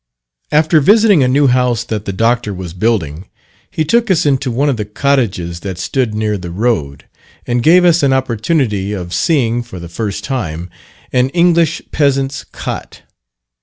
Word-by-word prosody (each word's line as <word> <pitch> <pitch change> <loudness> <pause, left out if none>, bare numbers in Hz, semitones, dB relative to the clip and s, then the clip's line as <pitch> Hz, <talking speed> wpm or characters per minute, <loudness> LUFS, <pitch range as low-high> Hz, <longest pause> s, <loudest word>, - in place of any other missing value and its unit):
After 155 +1 +3
visiting 205 0 +5
a 130 - +3
new 140 +3 +3
house 125 -3 +2
that 110 -3 -4
the - - -3
Doctor 115 0 0
was 90 -3 -7
building, 90 -5 -1 0.4
he 155 - -2
took 235 +6 +1
us 180 -3 +2
into 135 -2 +1
one 130 +5 0
of 135 -4 0
the 105 - -2
cottages 105 -7 -1
that 95 -1 -6
stood 105 +5 -1
near 105 -1 -1
the 90 -1 -7
road, 85 - -2 0.4
and 120 0 0
gave 175 +6 +5
us 170 -1 +4
an 140 -2 +2
opportunity, 120 - 0
of 90 -3 -6
seeing, 120 - +1
for 120 -5 -10
the 85 - -8
first 105 +4 -4
time, 90 - -4 0.4
an 125 +1 +2
English 170 -2 +2
peasant's 135 -2 0
cot. - - -7
120 Hz, 165 wpm, -15 LUFS, 100-140 Hz, 0.4 s, visiting